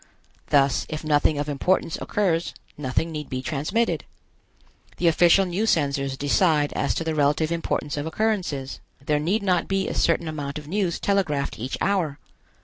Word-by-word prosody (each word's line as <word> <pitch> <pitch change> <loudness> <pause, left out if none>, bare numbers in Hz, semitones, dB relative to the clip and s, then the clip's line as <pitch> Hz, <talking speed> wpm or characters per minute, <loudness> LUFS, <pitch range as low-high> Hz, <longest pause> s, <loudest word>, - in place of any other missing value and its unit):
Thus, 140 -2 +3
if 155 0 -5
nothing 150 0 +2
of 145 0 -2
importance 160 +4 0
occurs, 175 -5 0 0.2
nothing 145 +4 -1
need 150 -2 -6
be 130 0 -4
transmitted. 155 - -1 0.9
The 175 - +1
official 175 +3 +5
news 195 +5 0
censors 140 -3 0
decide 145 +1 +2
as 140 - 0
to - - -1
the 160 -1 -1
relative 150 +2 +1
importance 165 -2 -2
of 145 +2 -3
occurrences. 175 -8 -2 0.2
There 150 +2 0
need 190 +8 0
not 180 -3 +1
be 195 0 0
a - - -3
certain 165 0 +1
amount 145 -2 -4
of 150 -1 -8
news 185 0 -1
telegraphed 155 - 0
each 125 +4 -3
hour. 180 -8 0
155 Hz, 160 wpm, -24 LUFS, 145-180 Hz, 0.9 s, official